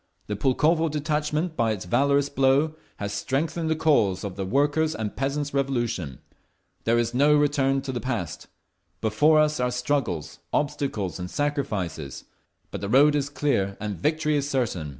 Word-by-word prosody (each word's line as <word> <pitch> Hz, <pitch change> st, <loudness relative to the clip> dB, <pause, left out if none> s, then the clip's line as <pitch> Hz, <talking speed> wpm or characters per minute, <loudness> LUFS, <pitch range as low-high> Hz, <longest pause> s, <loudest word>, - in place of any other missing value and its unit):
The 105 Hz, -, -3 dB
Pulkovo 155 Hz, +9 st, +2 dB
detachment 150 Hz, +2 st, -1 dB
by 115 Hz, -4 st, +1 dB
its 95 Hz, -4 st, -6 dB
valorous 140 Hz, +8 st, +2 dB
blow 140 Hz, +3 st, +2 dB, 0.2 s
has 100 Hz, 0 st, -4 dB
strengthened 160 Hz, +7 st, -1 dB
the 160 Hz, -, +2 dB
cause 110 Hz, -13 st, +2 dB
of 100 Hz, -3 st, -5 dB
the 95 Hz, -1 st, -4 dB
Workers' 145 Hz, +6 st, +1 dB
and 110 Hz, -2 st, -4 dB
Peasants's 140 Hz, +2 st, -2 dB
Revolution. 120 Hz, -, -1 dB, 0.7 s
There 115 Hz, +1 st, +3 dB
is 120 Hz, 0 st, 0 dB
no 145 Hz, +4 st, +4 dB
return 135 Hz, -2 st, +2 dB
to 135 Hz, -, -3 dB
the 125 Hz, -, -4 dB
past. 90 Hz, -, -4 dB, 0.5 s
Before 145 Hz, +9 st, +4 dB
us 150 Hz, -1 st, +2 dB
are 125 Hz, 0 st, +1 dB
struggles, 125 Hz, -, -2 dB
obstacles 135 Hz, -11 st, -1 dB
and 90 Hz, 0 st, -5 dB
sacrifices. 105 Hz, -, -3 dB, 0.5 s
But -, -, -5 dB
the 100 Hz, -, -3 dB
road 140 Hz, +5 st, +6 dB
is 145 Hz, -1 st, 0 dB
clear 115 Hz, -10 st, 0 dB
and 105 Hz, -1 st, -3 dB
victory 155 Hz, -, 0 dB
is 140 Hz, 0 st, -1 dB
certain. 110 Hz, -, -1 dB
135 Hz, 160 wpm, -25 LUFS, 105-150 Hz, 0.7 s, road